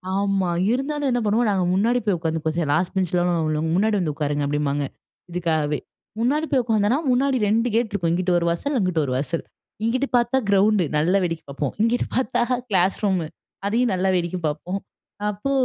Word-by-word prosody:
ஆமா. 195 -2 +1 0.2
இருந்தாலும் 280 +2 -1
என்ன 245 - +1
பண்ணுவோம், 220 +2 +2
நாங்க 190 -2 +1
முன்னாடி 230 +6 +2
போய் 195 -4 +2
உட்காந்துப்போம், 160 -1 -2
"சரி. 165 -4 0
லாஸ்ட் 180 +2 0
பெஞ்ச்ல 180 -2 +1 0.3
உள்ளவங்கலாம், 155 +1 -1
முன்னாடி 210 +3 +2
வந்து 155 -5 -1
உட்காருங்க." 145 -1 -1
அப்படிம்பாங்க. 145 -1 0 0.5
இதுக்காகவே 160 -4 0 0.4
முன்னாடி 290 +7 +1
போய் 265 -3 +3
உட்காந்தோம்னா, 220 +2 +2
முன்னாடி 260 +1 +2
2 230 +3 +2
கேட் 230 -1 +1
இருக்கும். 180 -5 0
இங்கிட்டு 180 +1 +1
ஒரு 170 - 0
வாசல், 280 +13 -1
அங்கிட்டு 180 -7 +1
ஒரு 130 - -3
வாசல். 155 +5 -2 0.4
இங்கிட்டு 255 +5 +1
பார்த்தா 240 +2 +2
கிரவுண்டு. 200 -1 +4
நல்லா 170 +6 +3
வேடிக்கை 165 -2 -3
பார்ப்போம். 140 -1 -3
இங்கிட்டு 230 +2 +2
பார்த்தா 245 -1 +1 0.3
கிளாஸ் 190 -1 +2
ரூம். 190 -3 +2 0.5
அதையும் 235 +2 +1
நல்லா 190 +1 +1
வேடிக்கை 175 +1 -1
பார்ப்போம். 170 +6 -3 0.5
அப்போ 210 +7 -3
190 Hz, 175 wpm, -23 LUFS, 165-230 Hz, 0.5 s, கிரவுண்டு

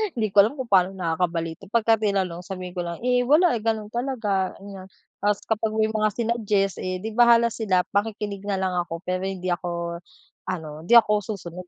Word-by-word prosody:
hindi 215 -4 -1
ko 200 - +4
alam 230 +7 -1
kung 260 -4 -6
paano 190 0 +4
nakakabalita 165 0 -2
pagka 225 0 +2
tinanong 190 -5 -1
sabihin 185 -2 -6
ko - - -4
lang, 170 +7 -7
"Eh 250 0 +2
wala, 330 +5 +5
eh - - -2
ganun 220 -2 -1
talaga." 225 -7 -1
Aniya, 195 -1 -10 0.3
tas 205 0 0
kapag 220 0 -1
may 220 0 +1
mga 215 -1 +1
sinuggest 215 -4 0
eh 185 0 -3
di 220 - -4
bahala 235 0 +5
sila 185 -6 +1
makikinig 205 -1 -2
na 200 - 0
lang 185 -1 0
ako 170 0 -5
pero 185 +1 -2
hindi 185 -2 -3
ako 170 -1 -3 0.5
ano, 160 -4 -5
hindi 240 - +5
ako 210 -2 +6 0.2
susunod. 180 0 -9
200 Hz, 190 wpm, -24 LUFS, 180-225 Hz, 0.5 s, ako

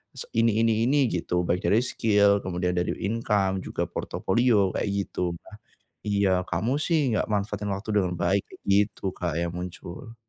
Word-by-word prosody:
se - - -7
ini 115 -1 +3
ini 115 -1 +2
ini 140 +3 +3
gitu 90 0 -1
baik 90 +1 +1
dari 105 - +4
skill 105 -4 +3
kemudian 90 0 -1
dari 90 0 0 0.2
income 100 -3 0
juga - - -2
portofolio 105 -2 +1
kayak - - -1 0.2
gitu, 85 -1 -2 0.7
iya 100 -1 +2 0.2
kamu 105 +8 0
sih 165 - +2 0.2
gak - - 0
manfaatin 105 0 -1
waktu 100 +3 -8
dengan 90 -3 +1
baik 95 +3 +2 0.3
gitu 100 -1 +2
Kak, 85 -3 -3
yang 85 0 -2
muncul. 90 +4 -8
100 Hz, 155 wpm, -26 LUFS, 90-110 Hz, 0.7 s, dari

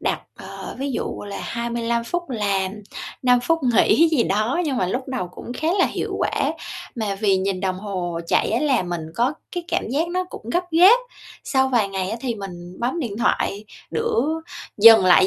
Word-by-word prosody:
đặt, - - -1 0.2
ờ, - - -8
ví 275 +1 -2
dụ - - -3
là 200 - -5
25 235 0 -2
phút 345 +3 -3
làm, 200 -4 0 0.5
5 250 -1 +4
phút 330 +6 +1
nghỉ 260 +6 +4
gì 310 -7 +2
đó. 215 - 0
Nhưng 280 -4 -1
mà 185 - +1
lúc 250 +8 -3
đầu 255 -9 -3
cũng 180 - -8
khá 310 +5 -2
là 370 - +5
hiệu - - -3
quả, - - 0 0.4
mà 215 -5 -2
vì 195 -1 +2
nhìn 190 0 -1
đồng 185 -1 -1
hồ 180 -4 -3
chạy - - +2
á, 230 - +1
làm 260 -12 +1
mình 170 -2 -3
có 245 +7 +2 0.2
cái 350 -1 -4
cảm - - -1
giác 300 +8 0
nó 365 +1 -1
cũng 235 -10 -9
gấp 360 - +1
gáp, 365 +9 +7 0.5
sau 265 -1 +2
vài 235 -6 +2
ngày 190 0 -3
á 225 - -2
thì 245 -2 -2
mình 180 -3 -8
bấm 255 +8 -1
điện 225 -7 -4
thoại 205 -3 0 0.3
giữa 455 0 0 0.6
dừng 220 -1 +9
lại 185 0 +6
235 Hz, 200 wpm, -22 LUFS, 195-270 Hz, 0.6 s, dừng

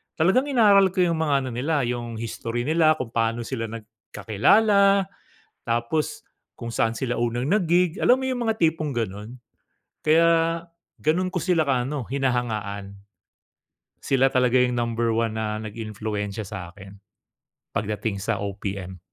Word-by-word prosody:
talagang 190 - +2
inaral 205 -8 +5
ko 185 -1 +2
'yong 170 -2 +1
mga 155 -3 +1
ano 130 - -4
nila, 145 +2 0
'yong 120 -1 -3
history 115 +1 -4
nila, 155 0 +4
kung 120 -5 -5
pa'no 115 0 0
sila 115 -4 -3
nagkakilala, 195 - +2 0.6
tapos 120 +6 -2 0.3
kung 115 0 -5
saan 115 0 +1
sila 125 -2 -2
unang 120 +2 -1
nag-gig. 180 -1 +2
Alam 255 - +5
mo - - -3
'yong 255 -1 -2
mga - - +1
tipong 160 -2 +1
gano'n? 105 -1 -4 0.8
Kaya 165 +2 +5 0.7
gano'n 180 +4 +1
ko 180 - 0
sila 170 -1 +2
ka 130 -3 +1
ano, 140 -5 -4
hinahangaan. 110 -7 -2 1.1
Sila 135 0 +2
talaga 125 0 +2
'yong 125 0 +3
number 115 -1 0
one 115 -1 -1
na 110 -1 -2
nag-impluwensiya 105 -1 -5
sa'kin 95 0 -9 0.8
pagdating 105 -1 -2
sa 110 0 -1
OPM. 95 -2 -5
120 Hz, 140 wpm, -24 LUFS, 110-160 Hz, 1.1 s, inaral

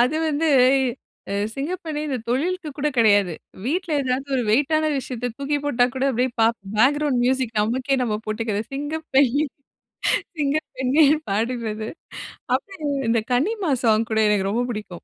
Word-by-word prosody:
அது 250 +6 +3
வந்து, 310 +2 0 0.8
அ - - -1 0.2
சிங்கப்பெண்ணே 315 +1 -4
இந்த 265 -3 -1
தொழிலுக்கு 325 +7 -1
கூட 300 - +1
கெடையாது. 205 -5 +4 0.3
வீட்ல 345 +5 -1
ஏதாவது 260 +1 -1
ஒரு 250 - +1
வெயிட்டான 310 +6 +2
விஷயத்த 250 -2 -3
தூக்கிப் 290 +1 -2
போட்டா 245 -4 +3
கூட 260 0 -1
அப்டியே, 255 +1 0
ப - - +5 0.3
பேக்ரவுண்ட் 280 +3 +3
மியூசிக் 255 -3 0
நமக்கே 255 +5 0
நம்ம 220 -4 0
போட்டுகறது, 215 -1 -2
சிங்கப்பெண்ணே! 290 -1 +1 0.9
சிங்கப்பெண்ணே! 285 -1 +2 0.2
பாடுறது. 220 0 -2 0.7
அப்பறம் 310 -9 -3
இந்த 230 -1 +2
கனிமா 355 - 0
சாங் 225 -1 +3
கூட 220 - +2
எனக்கு 195 -2 +1
ரொம்ப 235 +4 0
புடிக்கும். 210 -6 -7
260 Hz, 135 wpm, -23 LUFS, 230-295 Hz, 0.9 s, ப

